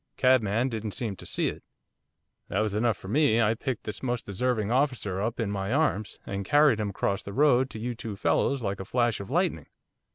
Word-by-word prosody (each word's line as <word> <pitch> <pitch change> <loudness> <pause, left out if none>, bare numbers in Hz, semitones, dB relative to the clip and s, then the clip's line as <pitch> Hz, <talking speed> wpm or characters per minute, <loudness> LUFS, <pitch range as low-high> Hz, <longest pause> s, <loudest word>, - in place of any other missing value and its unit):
Cabman 120 -2 +3
didn't 110 -3 -4
seem 115 -7 -3
to - - -10
see - - 0
it." - - -9 0.8
That 100 - 0
was 110 -2 -1
enough 110 -1 +1
for - - -11
me, 130 0 +3
I 110 -1 +3
picked 125 +1 -4
this 105 - -6
most 125 -2 -2
deserving 110 +1 -1
officer 125 -8 0
up 115 +3 -2
in 110 -3 -1
my 100 0 -2
arms, 120 -9 0
and 100 0 -3
carried 145 +1 +4
him 105 -1 -1
across 100 0 -1
the 100 - -8
road 130 -1 +4
to - - -8
you 120 +2 -3
two 110 -2 -6
fellows 130 +6 +1
like 100 -1 -2
a - - -4
flash 120 -1 +1
of 100 - -7
lightning. - - 0
115 Hz, 215 wpm, -27 LUFS, 100-125 Hz, 0.8 s, carried